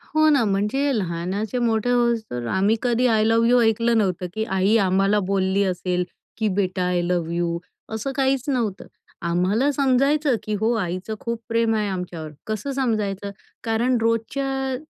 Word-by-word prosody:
हो 310 0 +5
ना, 280 -5 +4
म्हणजे 210 +8 0
लहानाचे 190 +5 -2
मोठे 230 -1 +1
होउस्तर 230 - 0
आम्ही 200 +4 +2
कधी 245 0 +1
आय 220 -2 +3
लव्ह 225 +1 +3
यू 245 +1 +5
ऐकलं 230 +1 +2
नव्हतं, 185 -4 0
की 220 - -1
आई 195 0 +1
आम्हाला 195 +1 +2
बोलली 195 0 +1
असेल 180 -1 -1 0.3
की 220 - 0
बेटा 185 -2 0
आय 180 -1 +1
लव्ह 175 -1 -1
यू 170 0 -1 0.4
असं 220 +5 -3
काहीच 270 -1 +1
नव्हतं. 230 -8 -1 0.4
आम्हाला 185 +11 +1
समजायचं 275 +1 +2
की 215 - -3
हो, 225 +3 +2
आईचं 185 +1 -3
खूप 235 -1 -4
प्रेम 230 -1 +2
आहे 210 -1 0
आमच्यावर. 180 -4 -5 0.2
कसं 215 +5 -3
समजायचं? 210 -6 -1 0.3
कारण 235 +3 +1
रोजच्या 265 +4 -1
220 Hz, 155 wpm, -23 LUFS, 190-240 Hz, 0.4 s, हो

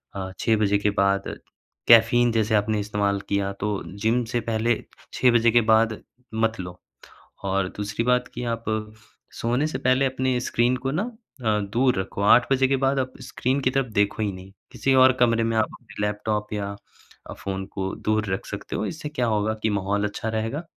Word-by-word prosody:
अ, 95 -1 -4
6 110 -1 +2
बजे 105 -1 +2
के 105 - +1
बाद 100 0 0 0.5
कैफ़ीन 120 +1 +6
जैसे 110 -1 +1
आपने 105 +1 +1
इस्तेमाल 100 -1 -1
किया 100 -1 0
तो 105 - 0 0.3
जिम 115 +3 +2
से 120 - +2
पहले 115 +1 +1 0.4
6 125 - +4
बजे 120 -1 +4
के 120 +1 +5
बाद 110 -1 +2 0.3
मत 110 -1 0
लो। 90 0 -7 0.7
और 95 -1 0
दूसरी 105 +2 -2
बात 125 0 +2
कि - - -4
आप 115 0 -4 0.8
सोने 125 +6 +1
से 155 - -3
पहले 130 +1 +3
अपने 130 -1 0
स्क्रीन 120 0 +1
को 135 - +1
ना 165 +8 0 0.4
अ, 105 -1 +2
दूर 120 +2 +1
रखो। 95 +1 -4
8 120 +5 +5
बजे 135 0 +4
के 135 - +3
बाद 135 0 +2
आप 130 0 -2
स्क्रीन 130 +1 -1
की 130 - +2
तरफ़ 135 -1 0
देखो 100 +1 +1
ही 105 - -1
नहीं, 95 0 -11 0.2
किसी 135 - 0
और 130 0 +7
कमरे 115 -1 +4
में 115 0 0
आपने 110 -1 -3
लैपटॉप 105 0 -2
या 100 -1 -3 0.5
अ, - - -5
फ़ोन 95 -1 -5
को 95 -1 -3 0.2
दूर 110 0 +2
रख - - -4
सकते - - -6
हो। - - -1
इससे 150 -2 -5
क्या 125 -5 -1
होगा 110 -1 +1
कि 110 - +2
माहौल 100 +2 -1
अच्छा 110 +2 -4
रहेगा 115 +9 -3
110 Hz, 195 wpm, -24 LUFS, 105-125 Hz, 0.8 s, और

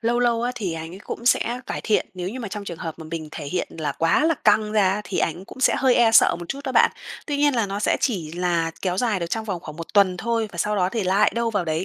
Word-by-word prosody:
lâu 235 +1 +1
lâu 235 -1 +2
á 245 +1 -1
thì 200 -8 -3
anh 160 +1 -6
ấy - - -10
cũng 235 +3 -7
sẽ 245 0 +2
cải - - -4
thiện 215 - +1
nếu 180 0 -4
như 255 +5 -6
mà 215 - -5
trong 205 +1 -6
trường 170 -4 -7
hợp 165 -1 -6
mà 160 - -8
mình 160 -2 -5
thể 145 - -6
hiện 180 +4 -2
là 145 -3 -1
quá 165 - +2
là 330 0 +3
căng 215 -3 +2
ra 200 -1 +2
thì 195 - -3
ảnh 170 +4 -1
cũng 260 - -12
sẽ - - +4
hơi 260 -2 +4
e 235 -2 +5
sợ - - +6
một 175 - -9
chút 275 - -4
đó 260 - -3
bạn. - - +5 0.4
Tuy 290 -2 -1
nhiên 290 -1 +3
là 230 -4 +1
nó 200 +1 -4
sẽ - - +2
chỉ 175 - -1
là 170 -2 0
kéo 180 -1 0
dài 220 -7 +1
được 170 - -2
trong 220 +5 -3
vòng 185 -5 -4
khoảng 155 -1 -9
1 165 +4 -9
tuần 190 -3 +4
thôi, 230 +2 -1
và 170 - -10
sau 210 +4 0
đó 180 -1 +2
thì 225 -3 -1
lại 190 +3 +3
đâu 235 0 0
vào 205 -5 -1
đấy, 160 +3 -1
200 Hz, 305 wpm, -23 LUFS, 175-235 Hz, 0.4 s, sợ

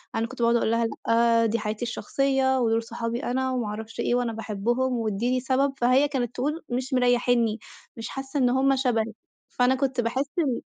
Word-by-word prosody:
أنا 225 +1 0
كنت 260 0 -8
باقعُد 235 0 +4
أقول 230 -1 +1
لها: 230 0 +2 0.2
"لأ، 230 0 +4
دي 225 +1 0
حياتي 215 +2 -3
الشخصية، 265 +3 0
ودوُل 230 -1 +1
صحابي 230 0 -4
أنا 260 +1 -1
وما 245 -4 -1
أعرفش 220 +1 -7
إيه 240 - +1
وأنا 245 -2 0
باحبهم 225 +4 -1
وادّيني 235 +2 0
سبب." 270 +2 +1
فهي 255 +3 +3
كانت 250 -5 -3
تقول: 300 +6 -2
"مش 255 +2 -3
مريحينّي. 245 -3 +2 0.4
مش 225 - -6
حاسة 270 +1 -4
إن 250 -2 +3
هُم 270 +2 +3
شبهِك." 230 -4 0 0.3
فأنا 250 +1 +2
كنت 265 -2 0
باحس 250 +4 -1
إن 270 -8 0
245 Hz, 185 wpm, -25 LUFS, 230-260 Hz, 0.4 s, باقعُد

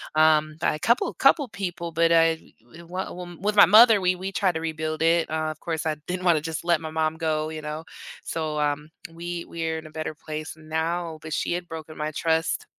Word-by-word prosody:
um, 155 0 +4
by 160 - +1
a 155 - -7
couple 235 - +2
couple 280 +1 +4
people. 175 -4 -5
But, 165 0 +3
uh, 165 -1 +5
w 160 +3 -17
well, 180 0 -5
m 175 -2 -9
with 210 +1 0
my 200 - +9
mother, 220 -1 +7
we 180 0 +2
we 190 +2 -5
tried 185 -4 +1
to - - -1
rebuild 155 -1 -3
it. 165 0 +3
Uh, 155 0 -1
of 155 - -11
course 160 -2 -3
I 155 -1 0
didn't 180 0 -3
wanna 165 -4 +4
just 160 +1 -5
let 170 -2 +2
my 160 - -5
mom 160 0 0
go, 155 -1 -1
you 155 -1 -6
know? 155 +1 -6 0.4
So, 155 -2 -2
um, 150 +1 -1 0.2
we 170 +1 -5
we're 160 -1 -3
in 160 - -11
a - - -12
better 155 0 -4
place 155 0 -6
now. 160 +1 -3
But 155 0 -6
she 170 - -1
had 175 0 -3
broken 160 -1 -8
my 150 0 -2
trust 160 +1 0
160 Hz, 225 wpm, -25 LUFS, 155-175 Hz, 0.4 s, my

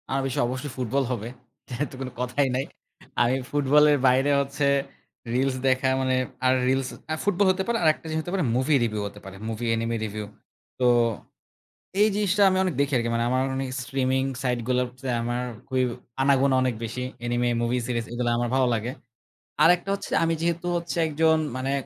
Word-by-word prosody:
আমি 135 0 0
স - - -6
অবশ্যই 130 +3 -4
ফুটবল 130 +2 0
হবে। 115 -3 -3 0.4
যেহেতু 135 +4 -4
তো - - -7
কোনো 130 -1 -4
কথাই 125 +3 +1
নাই 130 +2 0 0.6
আমি 120 +2 +3 0.2
ফুটবলের 145 +1 +4
বাইরে 130 +3 +3
হচ্ছে 140 +1 -2 0.7
reels 130 +1 +1
দেখা, 130 0 +2
মানে 130 0 +1 0.3
আর 130 - +5
reels 130 0 +1 0.2
আ - - +1
ফুটবল 205 0 +2
হতে 190 +1 -1
পারে 235 0 +1
আরেকটা 155 0 +2
জিনিস 160 0 -1
হতে 175 - -6
পারে 185 -6 +1
মুভি 135 +4 +2
রিভিউ 110 -2 -1
হতে 100 0 -11
পারে। 95 0 -9
Movie 115 +1 -4
enemy 115 +1 -1
review. 105 0 -5 0.5
তো 125 - +2 1.2
এই 210 - +6
জিনিসটা 205 -1 +2
আমি 185 - +1
অনেক 185 -4 -1
দেখি 140 0 +1
আরকি। 115 -1 0
মানে 115 0 +1
আমার 130 +1 +2
অনেক 135 0 -2
স্ট্রিমিং 130 +1 0 0.2
সাইট 125 -2 0
গুলোতে 125 0 -1 0.2
আমার 120 +1 -2 0.3
খুবই 130 -1 +1 0.4
আনাগোনা 135 0 +3
অনেক 130 -2 +1
বেশি। 115 +3 -4 0.2
এনিমে 120 0 +1
মুভি 120 +2 +1
সিরিজ 120 -2 -1
এগুলা 120 0 -1
আমার 120 0 0
ভালো 130 -1 +3
লাগে। 115 +2 -2 0.7
আরেকটা 175 +3 +4
হচ্ছে 200 - -8
আমি 165 0 +2
যেহেতু 170 +1 -1
হচ্ছে 170 0 -4
একজন 160 +1 +3 0.2
মানে 130 +1 -2
130 Hz, 180 wpm, -25 LUFS, 125-150 Hz, 1.2 s, এই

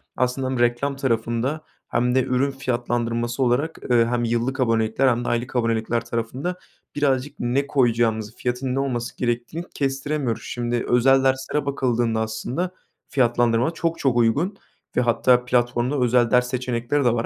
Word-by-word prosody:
aslında 130 +1 0
hem 130 -2 -2
reklam 120 +4 +1
tarafında 125 +3 -1 0.3
hem 125 +2 +1
de 130 - +4
ürün 130 +2 +1
fiyatlandırması 120 -1 -1
olarak, 135 +7 0
ııı, 115 -1 +5
hem 120 0 0
yıllık 120 +3 -1
abonelikler 115 +2 +2
hem 120 -1 +1
de - - -1
aylık 120 +2 -2
abonelikler 115 0 0
tarafında 120 +10 -3 0.4
birazcık 145 0 0
ne 130 +4 0
koyacağımızı, 115 -4 +1
fiyatın 125 +1 -2
ne - - 0
olması 120 -4 -3
gerektiğini 120 +7 -2
kestiremiyoruz. 135 -2 -1
Şimdi 120 0 -2
özel 135 +2 +4
derslere 135 +2 0
bakıldığında, 120 -5 0
aslında, 120 +11 -3 0.4
fiyatlandırma 120 +1 +2
çok 165 0 -2
çok 130 -3 +1
uygun 145 - +2 0.4
ve 125 - +5
hatta 125 +1 +3
platformda 120 +2 +1
özel 120 -1 +3
ders 125 0 +4
seçenekleri 125 +2 -1
de 120 - +4
var 115 0 -1
125 Hz, 150 wpm, -23 LUFS, 120-135 Hz, 0.4 s, ııı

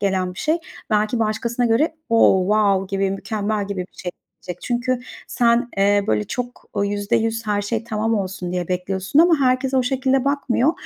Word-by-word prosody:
gelen 185 -2 0
bir - - -11
şey 315 +2 +1 0.3
belki 215 +3 +1
başkasına 230 +2 0
göre 245 +9 +2
o 225 -4 +5
wow 200 -1 +2
gibi, 195 0 +1
mükemmel 210 +1 -2
gibi 200 -2 -4
bir 180 - -9
şey 180 - -3 0.3
gelecek. 180 -1 -7
Çünkü 250 +1 -1 0.3
sen, 240 0 +2
eee, 200 +1 +3
böyle 105 -1 +1
çok, 245 - -5
ooo, 200 -1 +1
%100 220 +2 -1
her 205 -1 0
şey 225 +2 -2
tamam 220 0 -1
olsun 185 -3 -3
diye 180 -2 -2
bekliyorsun 185 +6 -1
ama 335 +1 +6
herkes 260 0 +1
o 260 - +4
şekilde 265 0 +1
bakmıyor 280 0 +1
215 Hz, 175 wpm, -21 LUFS, 195-245 Hz, 0.3 s, ama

